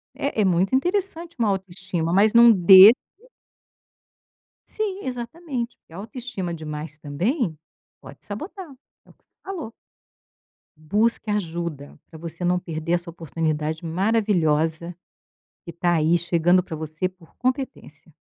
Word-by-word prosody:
É 275 -6 -1
é - - +3
muito 185 +6 +2
interessante 345 +1 -1
uma 220 -3 +2
autoestima, 185 -3 -3
mas 210 +3 +4
não 235 0 +8
deixe 195 +3 +9 1.7
Sim, 405 -3 -3
exatamente, 250 0 -5
porque - - -22
a - - -9
autoestima 215 -4 -5
demais 155 0 -7
também 170 - -2 0.4
pode - - -14
sabotar. 335 - -7 0.4
É - - -24
o - - -18
que - - -39
você - - -41
falou. 335 - -6 1.0
Busque 210 +8 0
ajuda 170 -7 -4
para 160 - -12
você 170 +2 -6
não 180 +1 +2
perder 165 -1 -4
essa 175 0 -1
oportunidade 160 -1 -3
maravilhosa 170 -4 +1 0.7
que 170 - -7
tá 175 +1 +1
aí 160 +2 +3
chegando 175 +1 +2
para 165 - -7
você 155 +3 -3
por 180 -3 -22
competência. 260 +1 -4
185 Hz, 130 wpm, -23 LUFS, 165-235 Hz, 1.7 s, deixe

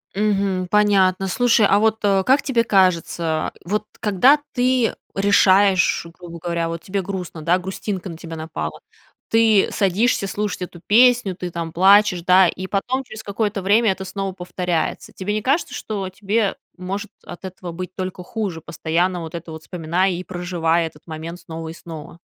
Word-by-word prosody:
Мгм. 195 -3 0
Понятно. 195 -2 +3
Слушай, 230 +2 +3
а 200 - +4
вот, 220 0 +2
э, 195 -2 +3
как 270 +3 +4
тебе 240 -4 +1
кажется, 170 -5 +1
вот 210 +4 -2
когда 220 +8 +4 0.2
ты 250 -2 +2 0.2
решаешь, 195 -2 +4
грубо 170 -1 -9
говоря, 170 0 -2
вот 165 0 -5
тебе 195 +2 -2
грустно, 180 -4 -6
да, 170 +4 +2
грустинка 190 0 -5
на 165 - -8
тебя 165 0 -8
напала. 155 - -5 0.5
Ты 225 -3 +4
садишься 200 +2 +1
слушать 205 -1 -3
эту 175 -1 -9
песню, 240 -3 +4
ты 180 0 -5
там 165 -1 -4
плачешь, 190 +1 +5
да, 185 +1 +6
и 185 +1 -5
потом 245 +8 -1
через 220 -2 -9
какое-то 205 0 -2
время 210 +3 +3
это 190 0 -5
снова 195 0 -4
повторяется. 180 -2 -3
Тебе 200 +2 -3
не 215 - -1
кажется, 275 +9 0
что 200 -3 -4
тебе 205 +2 -1 0.2
может 195 +4 -5 0.2
от 175 +2 -9
этого 185 -1 -7
быть 180 +1 -7
только 185 -1 -5
хуже, 195 -4 -4
постоянно 170 +3 -1
вот 160 -1 -8
это 170 -1 -7
вот 160 0 -9
вспоминая 180 +3 0
и 180 0 -4
проживая 170 -2 0
этот 150 -2 -15
момент 165 +2 -7
снова 165 -2 -7
и - - -7
снова? 165 -1 -10
185 Hz, 170 wpm, -21 LUFS, 170-205 Hz, 0.5 s, да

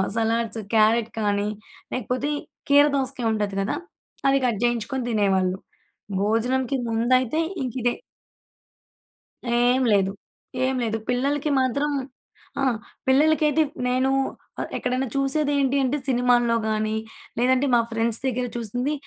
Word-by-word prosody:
Salads, 230 0 0
carrot 220 +1 +3
కానీ 205 -1 0 0.4
లేకపోతే 255 +4 -2 0.4
కీర 285 +1 +7
దోసకాయ 265 -2 -2
ఉంటది 205 -2 -2
కదా! 195 - -1 0.5
అది 275 - +4
కట్ 230 -5 0
జేయించుకొని 240 +2 0
తినేవాళ్ళు. 190 -3 +2 0.6
భోజనానికి 245 +5 +1
ముందయితే 250 +5 +2 0.2
ఇంకిదే. 245 -1 -1 1.7
ఏం 245 +2 +3
లేదు, 195 -2 +3 0.5
ఏం 265 - 0
లేదు. 225 -1 -1
పిల్లలకి 280 +4 0
మాత్రం 280 +3 0 0.7
ఆ! - - 0 0.4
పిల్లలకైతే 305 +2 +4
ప్ - - -31
నేనూ 255 +2 +2 0.5
ఆహ్, - - -3
ఎక్కడైనా 255 +1 -1
చూసేది 280 +2 +1
ఏంటి 275 0 +2
అంటే 265 +3 0
సినిమాల్లో 245 -2 +3
గాని, 215 0 0 0.4
లేదంటే 255 +3 +3
మా 235 - +5
ఫ్రెండ్స్ 225 0 0
దగ్గర 250 -1 -1
చూసింది. 245 +5 -2
245 Hz, 115 wpm, -24 LUFS, 225-265 Hz, 1.7 s, కీర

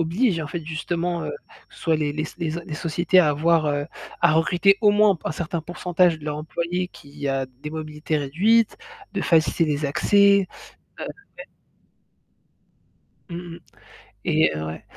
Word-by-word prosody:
obligent 170 +3 +1
en 150 - -6
fait 165 0 -5
justement 170 +2 -2
heu, - - -4 0.4
soit 165 - -1
les 150 -2 0
les 155 - -2
s 155 - -7
les 170 -2 -2
s 160 +2 -3
les 155 - -5
sociétés 175 +3 +2
à 155 - +3
avoir 155 +2 +2
heu, 145 0 -1 0.3
à 170 - +5
recruter 180 +5 +3
au 210 -2 +6
moins 210 0 +5
un - - -4
p 170 - -13
un - - 0
certain 170 +1 -3
pourcentage 175 0 +1
de 150 - -13
leurs 150 -1 -3
employés 170 +3 -3
qui 145 -3 -8
a 135 -1 0
des 130 +4 -10
mobilités 155 0 -3
réduites, 200 +11 +2 0.4
de - - -2
faciliter 165 0 +3
les 150 -1 -1
accès. 200 +6 +4 0.5
Heu - - -3
ouais. 445 +5 -10 1.8
Mmh 170 - -6 0.2
mh. - - -13 0.7
Et 80 0 +3
ouais 80 +1 -6
165 Hz, 170 wpm, -23 LUFS, 150-180 Hz, 1.8 s, au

